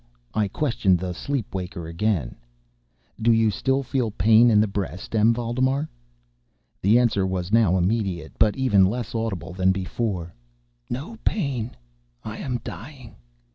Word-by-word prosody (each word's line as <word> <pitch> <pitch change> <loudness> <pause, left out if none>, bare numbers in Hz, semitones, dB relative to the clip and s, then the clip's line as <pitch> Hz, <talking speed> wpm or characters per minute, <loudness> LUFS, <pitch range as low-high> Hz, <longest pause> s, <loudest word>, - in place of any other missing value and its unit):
I 105 -2 +1
questioned 100 -6 +1
the 90 +1 -4
sleep 135 +4 -3
waker 90 -2 -5
again: 85 - -1 0.9
"Do 115 +1 +4
you 110 -1 +4
still 135 +5 0
feel 125 -2 -1
pain 110 +4 +5
in 105 -2 +5
the 105 - +4
breast, 100 +1 -4
M. 110 +1 +5
Valdemar?" 130 +5 0 0.9
The 105 +5 +5
answer 120 -5 +2
now 95 - +1
was 95 0 -3
immediate, 95 -4 +1
but 105 +2 +3
even 105 -8 +4
less 115 +2 -3
audible 100 -7 -3
than 95 0 +2
before: 95 -2 -3 0.6
"No 155 - -5
pain—I 105 - -4
am 125 -3 -3
dying." 120 - -9
110 Hz, 135 wpm, -24 LUFS, 95-120 Hz, 0.9 s, pain